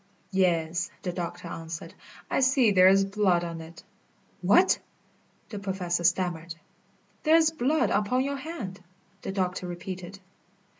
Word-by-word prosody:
"Yes," 175 -2 +1
the 180 - -2
doctor 175 -1 -5
answered, 165 -1 -7 0.3
"I - - 0
see 260 -4 +4
there 185 -1 +6
is 195 +1 +5
blood 195 -3 +2
on 165 -1 -5
it." 165 +1 -12 0.6
"What?" 275 - +5 0.7
the 205 - -6
Professor 185 -3 -2
stammered. 175 -2 0 0.7
"There 315 +1 +4
is 320 -1 +5
blood 305 +1 +1
upon 250 +5 +1
your 280 +1 -2
hand," 265 - -7 0.4
the - - -4
doctor 185 -2 -2
repeated. 180 +2 -7
185 Hz, 135 wpm, -27 LUFS, 175-225 Hz, 0.7 s, there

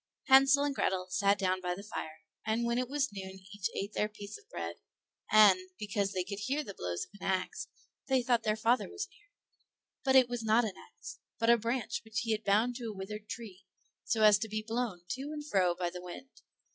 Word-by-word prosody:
Hansel 270 +1 +7
and 290 -1 0
Grethel 185 -7 0
sat 200 +2 +3
down 185 -1 0
by 180 -1 -1
the 200 - -9
fire, 160 -6 -6 0.2
and 225 +2 0
when 235 +1 +1
it 255 -1 -2
was 290 -3 0
noon 190 -1 -7
each 205 -1 -1
ate 200 +2 -3
the 210 - 0
piece 205 -1 -9
of 425 +1 -14
bread, - - -5 0.5
and, 210 -3 +8 0.2
because 205 -1 -1
they 185 -2 -1
could 200 +2 -6
hear 275 +8 -1
the 200 - -8
blows 90 - -3
of - - -28
an - - -4
ax, 185 -1 -1 0.4
they 265 -2 +2
thought 240 -1 +3
their 215 -1 +1
father 230 +3 +2
was 400 -1 -4
near; 415 0 -25 0.7
but 265 -1 +3
it 260 -2 +7
was 245 -1 -3
not 220 +2 +4
an 210 - -3
ax, - - -11 0.2
but 230 +1 +4
a 235 - +6
branch 235 +3 -2
which 220 -1 -3
he 225 -1 -2
had 215 0 0
bound 220 +5 +2
to 245 - -6
a 220 - -4
withered 210 +2 -7
tree, 200 -5 -8 0.4
so 220 -1 +1
as 210 -1 +7
to 220 +1 -3
be 215 +1 -3
blown 225 -6 -2
to 260 - -3
and 300 -1 -5
fro 185 -8 +2
by 175 -1 -2
the 180 0 -7
wind. 180 +9 -10
215 Hz, 225 wpm, -32 LUFS, 195-245 Hz, 0.7 s, and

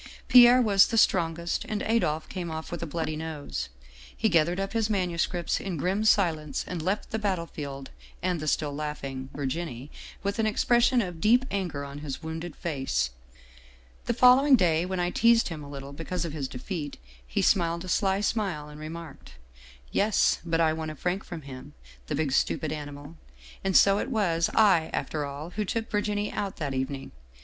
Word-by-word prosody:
Pierre 250 0 +8
was 200 -3 +5
the 230 - -1
strongest, 170 -4 +2
and 210 -1 -2
Adolphe 160 -9 0
came 180 -3 -5
off 160 0 -6
with 175 - -4
a 170 - -3
bloody 155 0 -3
nose. 145 - -5 0.5
He 220 - +2
gathered 170 +1 +2
up 195 0 -3
his 225 -1 +1
manuscripts 175 -3 0
in 185 -4 -4
grim 190 +8 0
si 210 -2 +6
lence 150 -3 -5
and 180 -3 -4
left 190 +6 -2
the 220 - -1
battlefield 160 -9 -4 0.3
and 180 -2 -1
the 155 - -5
still 150 -1 0
laughing 140 -3 -5
Virginie 140 -1 -4 0.3
with 200 +3 -2
an 220 - +2
expression 240 +3 +3
of 175 -3 -7
deep 245 +4 +4
anger 175 -8 -2
on 140 +1 -8
his 145 +1 -6
wounded 160 0 -5
face. 135 - -1 0.5
" - - -27
The 235 - +1
following 260 +3 +7
day, 175 -5 +2
when 185 -1 -2
I 175 0 0
teased 230 +1 +4
him 155 -3 -6
a 140 - -10
little 140 0 -8
because 170 +4 -3
of 160 - -5
his 145 -4 -3
defeat, 145 +3 -5 0.3
he - - -1
smiled 170 -1 +2
a - - -8
sly 195 +1 +1
smile 190 -9 -1
and 150 0 -11
remarked: 155 - -9 0.3
' 60 0 -22
Yes, 210 +1 +2
but 165 -1 0
I 160 -1 +3
won 160 0 -4
a 155 - -6
franc 180 +6 -2
from 165 -3 -8
him, 135 +1 -10 0.3
the 150 - -2
big 150 -2 0
stupid 150 +3 +1
ani^ 150 -1 -5
mal. 145 +3 -11 0.5
And 190 -1 +4
so 200 0 +5
it - - -3
was 175 -9 +1
I, 190 -7 +5
after 150 -2 -2
all, 145 +4 -7
who 210 +3 -2
took 225 +3 -3
Virginie 205 0 -1
out 195 -2 -3
that 145 -4 -3
evening. 135 +1 -3
165 Hz, 190 wpm, -27 LUFS, 145-195 Hz, 0.5 s, Pierre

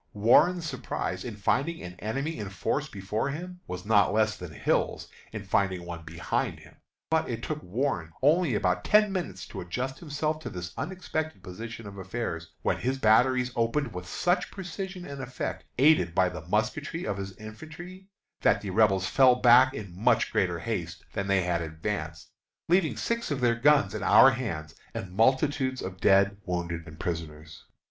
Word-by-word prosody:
Warren's 160 - +4
surprise - - -3
in 115 -3 -6
finding 140 - 0
an 90 0 -7
enemy 135 +9 -3
in 100 -2 -4
force 135 +10 -2
before 105 +6 -2
him 180 +5 -6
was 90 +1 -6
not 105 -3 +4
less 110 +1 +2
than 90 -3 -8
Hill's - - 0 0.2
in 110 - -6
finding 95 -2 0
one 85 -1 -6
behind 85 +1 -2
him; - - -17 0.3
but 160 0 +2
it 115 -1 -4
took 155 -1 -3
Warren 90 - -2
only 155 -2 +4
about 90 -3 +1
ten 210 -1 +4
minutes 95 - -4
to - - -6
adjust 125 +10 -4
himself 155 0 -2
to 155 - -6
this 90 -2 -6
unexpected 160 - -4
position 110 +4 -8
of 100 -1 -9
affairs, 95 -4 -4
when - - +1
his 130 +2 -1
batteries 125 +2 +4
opened 120 +5 0
with 90 -1 -6
such 180 - 0
precision 190 0 -6
and 140 -3 -7
effect, 130 0 -5
aided 130 - +4
by 90 - +4
the 90 -2 -9
musketry 145 - -1
of 100 - -2
his 95 -1 -6
infantry, 160 - -10 0.3
that 100 - +3
the 100 - -5
Rebels 95 -2 +3
fell 130 +5 +5
back 125 +2 +6
in 100 -5 -7
much 100 - +2
greater - - +1
haste - - -4
than 100 0 -2
they 95 -2 +3
had 85 -1 0
advanced, 80 -1 -5 0.4
leaving 165 - +2
six 235 - -2
of 145 -3 -1
their 120 -2 +3
guns 115 -4 +4
in 110 - -4
our 135 +6 +7
hands 85 - -4 0.2
and 95 - -5
multitudes 130 +4 +2
of 95 -1 -6
dead, 100 +1 +4
wounded, 85 -3 -3
and 80 +1 -11
prisoners. 80 -3 -6
110 Hz, 175 wpm, -28 LUFS, 90-145 Hz, 0.4 s, our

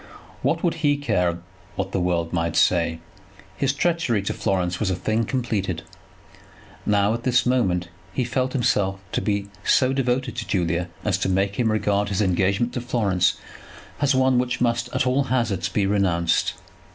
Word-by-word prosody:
What 155 +5 0
would 175 - +2
he 145 -1 +3
care 90 -11 0 0.4
what 95 -1 -3
the 95 - 0
world 85 -1 0
might 85 -1 -1
say? 85 -2 +3 0.6
His 135 +7 +1
treachery 150 - 0
to - - -2
Florence 90 -2 -1
was 105 - 0
a 95 - 0
thing 110 +5 0
completed. 100 -9 -2 1.0
Now, 105 +1 +3
at 115 - -3
this 125 -1 +2
moment, 95 -9 +1 0.2
he 125 - -1
felt 130 +2 -1
himself 100 -6 +1
to - - -1
be 100 -1 -1
so 130 0 +3
devoted 130 -1 0
to 115 - -4
Julia 90 -2 0 0.2
as - - +1
to - - 0
make 95 +2 0
him 115 -3 +2
regard 105 -1 +1
his 100 - -1
engagement 100 +4 +1
to 125 - -3
Florence 100 -7 +1 0.6
as 140 -2 +3
one 130 -1 +3
which 125 0 -1
must, 120 -1 0
at 140 - 0
all 130 +2 +2
hazards, 115 -8 0
be 105 - 0
renounced. 90 -4 +1
105 Hz, 170 wpm, -23 LUFS, 95-125 Hz, 1.0 s, he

